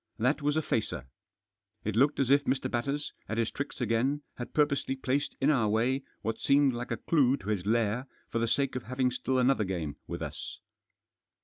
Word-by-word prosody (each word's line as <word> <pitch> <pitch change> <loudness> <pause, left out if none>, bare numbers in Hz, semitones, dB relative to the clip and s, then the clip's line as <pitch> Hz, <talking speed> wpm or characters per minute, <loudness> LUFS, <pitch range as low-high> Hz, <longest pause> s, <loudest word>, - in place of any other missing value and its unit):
That 130 +7 +1
was 145 +1 +1
a 160 - +1
facer. 105 - -1 0.8
It 105 -1 -2
looked 140 +5 +3
as 135 -1 +2
if 140 0 +5
Mr. 130 0 0
Batters, 140 +5 -2 0.2
at 110 - -2
his 115 -1 +1
tricks 140 -1 -5
again, 125 +5 +1
had 120 - -6
purposely 140 -3 +1
placed 135 +1 -1
In 140 +3 +4
our 115 -7 +2
way 120 +6 +2 0.2
what 115 0 -2
seemed 140 -1 +4
like 120 +1 -4
a - - -1
clue 140 -5 +3
to 100 - -7
his 100 -3 -1
lair 115 +3 +1 0.2
for 115 - 0
the 115 - +1
sake 135 +3 +1
of 130 - -2
having 130 +1 0
still 130 +1 -1
another 125 -2 +3
game 85 -7 -3
with - - -4
us. - - -6
130 Hz, 200 wpm, -30 LUFS, 115-140 Hz, 0.8 s, if